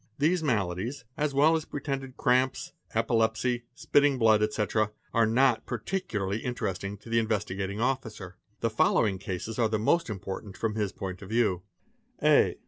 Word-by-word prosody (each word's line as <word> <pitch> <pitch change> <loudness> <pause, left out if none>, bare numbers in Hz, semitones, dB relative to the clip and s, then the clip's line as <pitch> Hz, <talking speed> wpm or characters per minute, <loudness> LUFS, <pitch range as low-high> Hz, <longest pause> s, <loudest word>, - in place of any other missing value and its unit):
These 165 +5 +2
maladies, 115 - -1
as 145 -2 -1
well 155 +4 +5
as 160 - -2
pretended 135 -2 -5
cramps, 130 0 +1 0.2
epilepsy, 115 +1 +1
spitting 145 -1 +3
blood, 110 -3 +4
etc., 105 0 +1 0.2
are 115 -1 +4
not 125 +1 +3
particularly 110 - -2
interesting 105 -5 -3
to 110 - -14
the 115 0 +3
Investigating 100 -2 -2
Officer. 115 -7 -2 0.3
The 115 - +1
following 105 -2 +2
cases 100 +4 -5
are 115 -2 +3
the 110 - +1
most 125 +7 +2
important 95 0 -6
from 115 -2 -1
his 105 -3 -1
point 95 -2 -6
of 95 - -9
view. 110 -6 +1 0.6
A. - - +4
115 Hz, 150 wpm, -28 LUFS, 105-130 Hz, 0.6 s, well